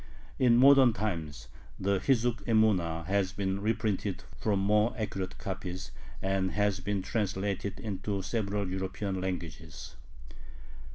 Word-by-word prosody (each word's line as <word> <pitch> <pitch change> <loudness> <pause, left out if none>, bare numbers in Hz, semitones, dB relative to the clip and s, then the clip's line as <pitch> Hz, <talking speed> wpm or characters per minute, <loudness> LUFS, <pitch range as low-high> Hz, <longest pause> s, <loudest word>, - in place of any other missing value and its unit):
In 120 -2 +5
modern 135 -2 +7
times 80 - -3 0.3
the 100 0 +1
Hizzuk 120 -1 +1
Emuna 95 -8 +2
has 95 0 +1
been 95 0 -2
reprinted 105 -3 -1
from 105 -3 0
more 105 +3 +2
accurate 100 -4 -3
copies, 95 -1 -5 0.3
and 95 -1 0
has 105 -2 +1
been 100 0 -2
translated 100 -1 -2
into 100 -1 -3
several 100 -2 -1
European 95 +1 -3
languages. 80 -4 -6
100 Hz, 115 wpm, -30 LUFS, 95-105 Hz, 0.3 s, modern